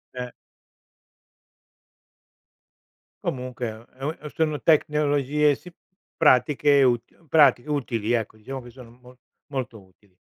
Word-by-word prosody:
Eh. 125 -1 -5 2.9
Comunque, 125 -2 -4
è 110 - -5
un 115 +2 -15
e - - -9
un 155 +3 -3
eh, 150 - -7
sono 155 -2 -1
tecnologie 150 -2 +2
si 180 +3 -14 0.4
pratiche 145 -1 +4
util 125 +6 -1
pratiche 145 -2 +4
utili, 120 -6 -1
ecco, 110 -2 -2
diciamo 130 +5 -7
che 120 - -12
sono 120 -2 -14
mol 125 +1 -18 0.3
molto 125 -6 -5
utili. 95 0 -26
130 Hz, 125 wpm, -24 LUFS, 120-150 Hz, 2.9 s, pratiche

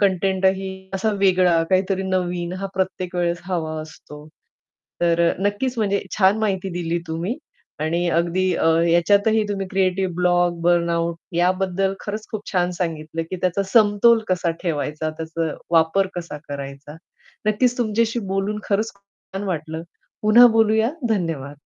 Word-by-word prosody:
कंटेंटही 190 0 +1 0.3
असा 195 +3 0
वेगळा, 180 -3 +4
काहीतरी 190 0 +1
नवीन 180 -2 -2
हा 195 - -2
प्रत्येक 185 -1 -2
वेळेस 175 0 0
हवा 165 -4 -2
असतो. 150 -1 -12 0.7
तर 170 -1 +2
अ, - - 0
नक्कीच 245 +5 -1
म्हणजे 200 -2 +1 0.2
छान 195 +1 +4
माहिती 195 -3 -1
दिली 170 0 -1
तुम्ही 170 +9 -2 0.4
आणि 170 +3 0
अगदी 185 +2 0
अ, - - 0 0.2
याच्यातही 205 +6 +3
तुम्ही 195 -1 -2
क्रिएटिव्ह 190 -1 0
ब्लॉग, 175 -1 +2
बर्नआउट 170 -1 +1 0.2
याबद्दल 185 +2 +1
खरंच 215 +1 -5
खूप 215 -1 -6
छान 180 -2 +1
सांगितलं, 160 -2 -3
की 185 - -3
त्याचा 185 +2 +1
समतोल 225 +1 +5
कसा 180 -2 +1
ठेवायचा, 155 -2 -2
त्याचा 160 0 -4 0.2
वापर 165 +4 +3
कसा 170 -4 -5
करायचा. 140 +1 -7 0.5
नक्कीच 240 +4 +2
तुमच्याशी 230 0 +1
बोलून 195 +2 -1
खरंच 215 +2 0
खूप 200 - -30 0.3
छान 195 +1 -3
वाटलं. 160 -2 -4 0.4
पुन्हा 225 +3 +8
बोलूया. 220 0 +3 0.2
धन्यवाद. 155 -9 -2
185 Hz, 140 wpm, -22 LUFS, 170-200 Hz, 0.7 s, पुन्हा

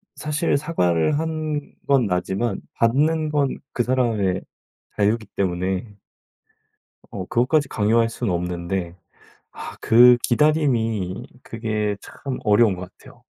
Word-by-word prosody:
사실 150 +1 -1
사과를 140 - +1
한 155 -2 -3
건 135 -4 +3
나지만 95 +4 -1
받는 155 +7 +2
건 145 -3 0 0.2
그 120 - +1
사람의 115 -7 0 0.5
자유기 110 +2 +1
때문에 95 +2 -2 1.1
어 95 -2 -6
그것까지 135 +6 +1
강요할 115 +2 +2
수는 115 -3 -3
없는데 90 0 -3 0.6
아 - - -9
그 120 +2 +7
기다림이 120 - +1 0.2
그게 110 -2 -2
참 135 -2 -7
어려운 105 -1 +4
것 90 - -7 0.2
같아요. - - -17
115 Hz, 235 characters per minute, -22 LUFS, 95-140 Hz, 1.1 s, 그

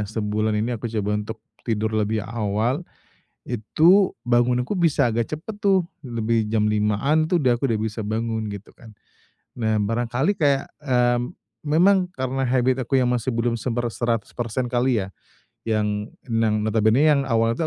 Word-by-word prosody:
sebulan 110 0 -1
ini 115 +3 -1
aku 115 +2 -5
coba 105 -2 -2
untuk 110 +2 -7 0.2
tidur 110 -1 -1
lebih 110 -1 0
awal, 115 - -1 0.6
itu 160 - +3
bangunku 125 +2 +2
bisa 165 -8 +2
agak 115 0 -1
cepet 190 +8 -8
tuh, 195 -3 +3 0.2
lebih 115 -3 -1
jam 110 -1 +1
05:00-an 105 +9 +1
tuh 180 - +2
aku 160 - -1
dah 125 - +5
aku - - -3
udah 110 -2 0
bisa 110 +1 -3
bangun, 110 0 -2
gitu 100 0 -8
kan. 115 -3 -15 0.7
Nah, 110 -1 +1
barangkali 120 - 0
kayak, 140 -3 +1
eee, 125 -4 +2 0.5
memang 180 +5 +4
karena 130 0 -1
habit 130 +1 +2
aku 135 - +1
yang 125 -2 +3
masih 125 0 -1
belum 115 0 0
seber 120 0 -1
seratus 115 -2 -2
persen 120 +1 -3
kali 120 -3 +1
ya. - - -7 0.6
Yang 105 -1 -1 0.2
nang 110 -2 +1
notabenenya 110 +6 +3
yang - - +1
awalnya 115 +5 +1
115 Hz, 160 wpm, -23 LUFS, 110-130 Hz, 0.7 s, dah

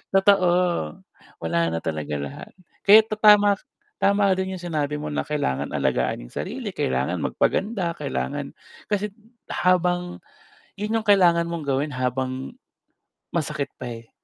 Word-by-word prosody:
Totoo. 195 -2 +5 0.9
Wala 85 +1 0
na 80 - -1
talaga 75 -2 -3
lahat. 70 -1 -7 0.4
Kaya 215 +2 +10
ta 215 - -3
tama 205 -1 +7
k - - -21 0.4
tama 200 0 +3
rin 190 0 -2
yung 180 - -9
sinabi 150 -4 -2
mo 150 - -5
na - - -1
kailangan 145 - -1
alagaan - - 0
yung - - -18
sarili, - - -4
kailangan 65 0 0
magpaganda, 190 -5 0
kailangan 65 - -3 0.4
kasi't 205 0 -1 0.3
habang 180 0 +1 0.6
'yun 215 +3 -1
yung 220 - -12
kailangan 170 -4 +5
mong 170 -3 -4
gawin 140 +2 0
habang, 130 - -2 0.8
masakit 150 -3 -1
pa, - - -6
eh. 115 - -25
170 Hz, 140 wpm, -24 LUFS, 130-195 Hz, 0.9 s, Kaya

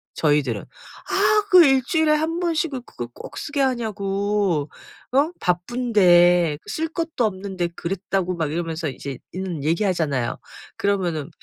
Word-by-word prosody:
저희들은. 145 -8 +1
"아 425 -1 -1
그 365 -2 +9
1 270 -1 +4
주일에 315 -1 +2
1 320 +2 0
번씩 330 -3 0
그 255 -2 -4
그걸 120 - -8
꼭 - - -10
쓰게 290 -2 -2
하냐고 200 - 0 0.4
어? 285 +6 +3
바쁜데 180 -5 +3
쓸 320 +1 -2
것도 325 -5 -2
없는데 190 -3 -2
그랬다."고 185 0 -2
막 160 -3 -2
이러면서 165 -1 -3
이제 135 0 -7
있는 180 -5 -4
얘기하잖아요. 155 - 0 0.4
그러면은 180 -7 -1
190 Hz, 280 characters per minute, -22 LUFS, 165-260 Hz, 0.4 s, 그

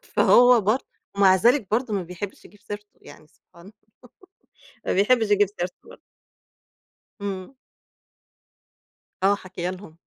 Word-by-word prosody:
فهو 245 -1 +5
برض 215 +6 +1 0.4
ومع 195 -2 +5
ذلك 235 +3 +3
برضو 230 0 -1
ما 195 -2 -1
بيحبش 180 +3 -8
يجيب 205 +3 -18
سيرته، 205 0 -10
يعني 155 - -15
سبحان 170 +3 -22
الله، 205 - -14 1.1
ما - - 0
بيحبش 220 +2 +2
يجيب 205 -1 +4
سيرته 180 +1 -6
برضو. - - -15 1.2
امم. 195 +3 -6 1.7
آه 200 +1 +4
حاكيه 180 -2 -6
لهم، 185 -3 -10
200 Hz, 125 wpm, -23 LUFS, 185-215 Hz, 1.7 s, فهو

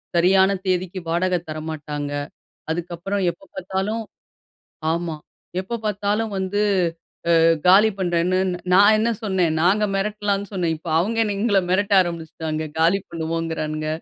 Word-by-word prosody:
சரியான 190 +3 +5 0.2
தேதிக்கு 185 0 -1
வாடக 180 +2 +1
தரமாட்டாங்க. 150 -2 -5 0.6
அதுக்கப்பறம் 175 +4 -3
எப்ப 170 - -20
பாத்தாலும் 190 +4 -2 0.9
ஆமா. 170 -1 -2 0.4
எப்போ 190 +5 -5
பார்த்தாலும் 210 +1 -1
வந்து 190 +2 -1 0.8
அ - - +4 0.3
காலி 195 +4 +7
பண்றேன்னு 175 0 +1 0.3
நான் 205 +3 +7
என்ன 225 +2 +1
சொன்னே, 190 -4 +1 0.2
நாங்க 200 +5 +3
மெரட்டலான்னு 205 0 -1
சொன்னேன். 175 -4 0
இப்போ 160 +2 -10
அவுங்க 210 +7 0
என்ன 210 -2 0
எங்கள 205 -3 +3
மெரட்ட 205 +2 +1
ஆரம்பிச்சிட்டாங்க. 160 -2 -4
காலி 170 +4 +4
பண்ணுவோங்குறானுங்க. 160 -2 -3
185 Hz, 120 wpm, -22 LUFS, 165-200 Hz, 0.9 s, காலி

